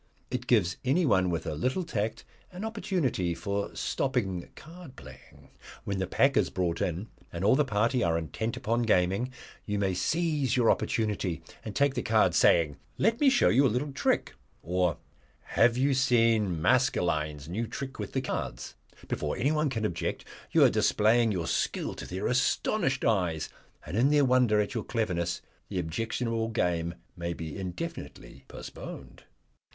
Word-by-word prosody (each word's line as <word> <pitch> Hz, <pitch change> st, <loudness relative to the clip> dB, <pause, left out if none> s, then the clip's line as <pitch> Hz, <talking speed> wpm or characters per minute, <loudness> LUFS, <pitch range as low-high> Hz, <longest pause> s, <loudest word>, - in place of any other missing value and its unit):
It 125 Hz, 0 st, -3 dB
gives 100 Hz, -6 st, +3 dB
anyone 130 Hz, -, +3 dB
with 85 Hz, -2 st, -2 dB
a -, -, -2 dB
little 130 Hz, -, -1 dB
tact 110 Hz, -9 st, -3 dB, 0.3 s
an 185 Hz, +4 st, -6 dB
opportunity 170 Hz, -, -1 dB
for 100 Hz, +4 st, -3 dB
stopping 100 Hz, -10 st, -1 dB
card 165 Hz, -3 st, -12 dB
playing. 65 Hz, -1 st, -15 dB, 0.3 s
When 100 Hz, -1 st, -3 dB
the 95 Hz, -, -1 dB
pack -, -, +3 dB
is -, -, +3 dB
brought 85 Hz, -2 st, -1 dB
in, 90 Hz, +5 st, -2 dB, 0.2 s
and 85 Hz, +3 st, -3 dB
all 110 Hz, -, +5 dB
the 150 Hz, -, +3 dB
party 115 Hz, +2 st, +1 dB
are 85 Hz, -1 st, +2 dB
intent 85 Hz, -, -3 dB
upon 120 Hz, -2 st, 0 dB
gaming, 100 Hz, +2 st, +1 dB, 0.3 s
you 105 Hz, -1 st, -2 dB
may 95 Hz, -2 st, +1 dB
seize 150 Hz, -, 0 dB
your 120 Hz, -2 st, +5 dB
opportunity 105 Hz, -6 st, -1 dB, 0.2 s
and 110 Hz, -, -7 dB
take 140 Hz, -1 st, +3 dB
the 125 Hz, -, -2 dB
cards, 110 Hz, -1 st, +3 dB
saying, 80 Hz, -4 st, +4 dB, 0.2 s
'Let 225 Hz, +3 st, +2 dB
me 285 Hz, -, +7 dB
show 260 Hz, -2 st, +4 dB
you 135 Hz, -, +4 dB
a -, -, +1 dB
little 130 Hz, +6 st, -1 dB
trick,' -, -, 0 dB, 0.3 s
or, 90 Hz, -1 st, 0 dB, 0.4 s
'Have 115 Hz, +1 st, +2 dB
you 135 Hz, +2 st, +2 dB
seen 115 Hz, -8 st, +3 dB
Maskelyne's 80 Hz, -, +1 dB
new 110 Hz, +7 st, -3 dB
trick 135 Hz, +2 st, -6 dB
with -, -, -5 dB
the 130 Hz, -, 0 dB
cards?' -, -, -4 dB, 0.3 s
Before -, -, -2 dB
anyone 150 Hz, +3 st, +1 dB
can 115 Hz, -4 st, -2 dB
object 85 Hz, -, -3 dB, 0.2 s
you -, -, +5 dB
are -, -, +7 dB
displaying 115 Hz, +2 st, +3 dB
your 90 Hz, -4 st, -2 dB
skill -, -, -1 dB
to -, -, -8 dB
their 95 Hz, +2 st, -4 dB
astonished 135 Hz, +3 st, +1 dB
eyes, 90 Hz, -8 st, +1 dB, 0.4 s
and -, -, -5 dB
in 125 Hz, +6 st, +4 dB
their 145 Hz, -1 st, +4 dB
wonder 125 Hz, -4 st, +4 dB
at 105 Hz, +2 st, -1 dB
your 115 Hz, -4 st, -2 dB
cleverness 90 Hz, -7 st, -2 dB, 0.3 s
the 100 Hz, -, -4 dB
objectionable 115 Hz, +6 st, -2 dB
game 85 Hz, -6 st, -1 dB, 0.2 s
may 85 Hz, -1 st, -3 dB
be 80 Hz, -2 st, -6 dB
indefinitely 100 Hz, -, -7 dB
postponed." -, -, -9 dB
110 Hz, 165 wpm, -29 LUFS, 90-130 Hz, 0.4 s, me